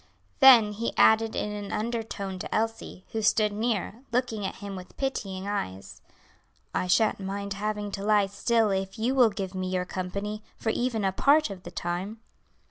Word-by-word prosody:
Then 235 Hz, -6 st, +8 dB
he 225 Hz, +3 st, -4 dB
added 220 Hz, 0 st, +5 dB
in 210 Hz, -, -2 dB
an 205 Hz, -1 st, -6 dB
undertone 215 Hz, -4 st, -3 dB
to -, -, -6 dB
Elsie, 225 Hz, -4 st, -3 dB
who 225 Hz, -, -2 dB
stood 210 Hz, 0 st, +3 dB
near, 220 Hz, +1 st, -2 dB
looking 230 Hz, -5 st, -1 dB
at -, -, -6 dB
him 200 Hz, -1 st, -7 dB
with 185 Hz, -1 st, -11 dB
pitying 200 Hz, -8 st, -3 dB
eyes, 95 Hz, -, -4 dB, 0.7 s
"I 180 Hz, -, -1 dB
shan't 210 Hz, +4 st, +3 dB
mind 200 Hz, +1 st, -4 dB
having 210 Hz, 0 st, -3 dB
to 195 Hz, 0 st, -5 dB
lie 210 Hz, -1 st, +4 dB
still 215 Hz, +2 st, +1 dB
if 195 Hz, +2 st, -2 dB
you 235 Hz, +4 st, 0 dB
will 250 Hz, -4 st, +5 dB
give 195 Hz, -2 st, -5 dB
me 185 Hz, -1 st, -3 dB
your 185 Hz, -1 st, -1 dB
company 200 Hz, +4 st, -4 dB, 0.2 s
for 225 Hz, -, -2 dB
even 230 Hz, -3 st, -1 dB
a 190 Hz, -, +2 dB
part 285 Hz, +4 st, +3 dB
of 190 Hz, -2 st, -8 dB
the -, -, -9 dB
time." 180 Hz, +6 st, -4 dB
205 Hz, 180 wpm, -27 LUFS, 195-225 Hz, 0.7 s, Then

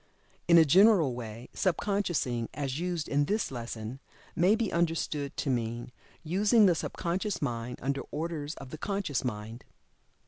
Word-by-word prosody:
In 170 Hz, -1 st, +7 dB
a 165 Hz, -, +8 dB
general 180 Hz, -, +5 dB
way, 115 Hz, 0 st, -7 dB
"Sub 185 Hz, -5 st, +1 dB
consciousing," 175 Hz, -, -1 dB
as 140 Hz, 0 st, -2 dB
used 175 Hz, -3 st, -2 dB
in 145 Hz, +1 st, +2 dB
this 210 Hz, +1 st, -1 dB
lesson, 120 Hz, 0 st, -6 dB, 0.4 s
may 185 Hz, +5 st, +4 dB
be 225 Hz, -2 st, -1 dB
understood 160 Hz, -4 st, -1 dB
to 140 Hz, -, 0 dB
mean 120 Hz, 0 st, -2 dB, 0.3 s
"using 205 Hz, +7 st, +4 dB
the 180 Hz, -, +5 dB
subconscious 180 Hz, +4 st, -2 dB
mind, 120 Hz, -3 st, -3 dB
under 135 Hz, +1 st, -1 dB
orders 155 Hz, -1 st, -4 dB
of 135 Hz, -2 st, -10 dB
the 155 Hz, -, -7 dB
conscious 195 Hz, -9 st, -2 dB
mind." 110 Hz, 0 st, -5 dB
150 Hz, 150 wpm, -29 LUFS, 125-180 Hz, 0.4 s, a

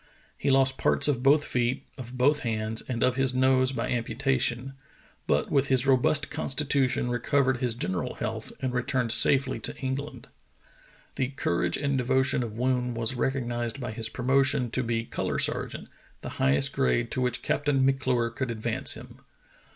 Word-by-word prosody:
He -, -, -2 dB
lost 135 Hz, -1 st, +3 dB
parts -, -, +2 dB
of 135 Hz, -5 st, 0 dB
both 145 Hz, +3 st, +4 dB
feet, 125 Hz, +2 st, -1 dB
of 125 Hz, -2 st, -9 dB
both 145 Hz, +4 st, +3 dB
hands, 110 Hz, -1 st, -2 dB
and 120 Hz, -3 st, -2 dB
of 125 Hz, 0 st, +2 dB
his 135 Hz, -1 st, +1 dB
nose 130 Hz, 0 st, +3 dB
by 135 Hz, -, -3 dB
amputation, 125 Hz, +2 st, -1 dB, 0.5 s
but 75 Hz, +1 st, +1 dB
with 140 Hz, -1 st, +2 dB
his 130 Hz, 0 st, +2 dB
robust 135 Hz, +2 st, +2 dB
constitution 135 Hz, -4 st, 0 dB
recovered 130 Hz, +1 st, +1 dB
his 120 Hz, -2 st, -1 dB
general 95 Hz, -6 st, -3 dB
health -, -, -5 dB
and 130 Hz, -1 st, -2 dB
returned 125 Hz, -1 st, 0 dB
safely 130 Hz, +1 st, +4 dB
to -, -, -4 dB
England. 135 Hz, +1 st, -5 dB, 0.9 s
The 130 Hz, -, 0 dB
courage 85 Hz, -10 st, -1 dB
and 140 Hz, -2 st, 0 dB
devotion 130 Hz, +1 st, +1 dB
of 110 Hz, -2 st, -5 dB
Woon 125 Hz, -1 st, 0 dB
was 115 Hz, +2 st, 0 dB
recognized 120 Hz, -1 st, -2 dB
by 125 Hz, -, -4 dB
his 110 Hz, 0 st, -1 dB
promotion 135 Hz, 0 st, +1 dB
to 130 Hz, -, 0 dB
be 115 Hz, -1 st, -2 dB
color -, -, -3 dB
sergeant, -, -, -1 dB, 0.3 s
the -, -, -6 dB
highest 70 Hz, +1 st, +3 dB
grade -, -, 0 dB
to 130 Hz, -, -1 dB
which 125 Hz, -1 st, -1 dB
Captain 145 Hz, -2 st, +1 dB
M'Clure 130 Hz, -3 st, +1 dB
could 130 Hz, +1 st, -4 dB
advance 110 Hz, -2 st, -1 dB
him. -, -, -12 dB
130 Hz, 165 wpm, -27 LUFS, 120-135 Hz, 0.9 s, both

